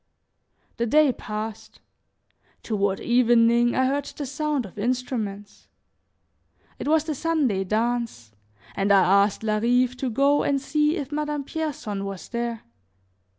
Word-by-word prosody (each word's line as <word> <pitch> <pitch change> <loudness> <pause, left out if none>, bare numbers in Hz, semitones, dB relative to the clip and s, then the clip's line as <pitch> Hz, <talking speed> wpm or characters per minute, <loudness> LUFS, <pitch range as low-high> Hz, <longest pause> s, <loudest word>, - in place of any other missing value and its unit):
The 235 - 0
day 300 +2 +4
passed; 215 -1 -7 0.8
toward 200 -3 -1
evening 240 0 +3
I 260 - +3
heard 280 +1 0
the 285 - -6
sound 290 -1 -2
of 195 +2 -11
instruments. 220 -4 -3 1.1
It - - -4
was 310 0 +3
the 315 -1 -3
Sunday 285 - 0
dance 225 - -2 0.4
and 195 +1 +1
I 200 0 +5
asked 205 - -5
Larive 240 +4 +2
to 260 0 -2
go 280 +5 +3
and 280 -1 +1
see 300 +3 +1
if 285 -3 -5
Madame 295 -1 -2
Pierson 275 -10 -4
was 195 -2 -7
there. 235 -1 -3
240 Hz, 130 wpm, -24 LUFS, 215-285 Hz, 1.1 s, I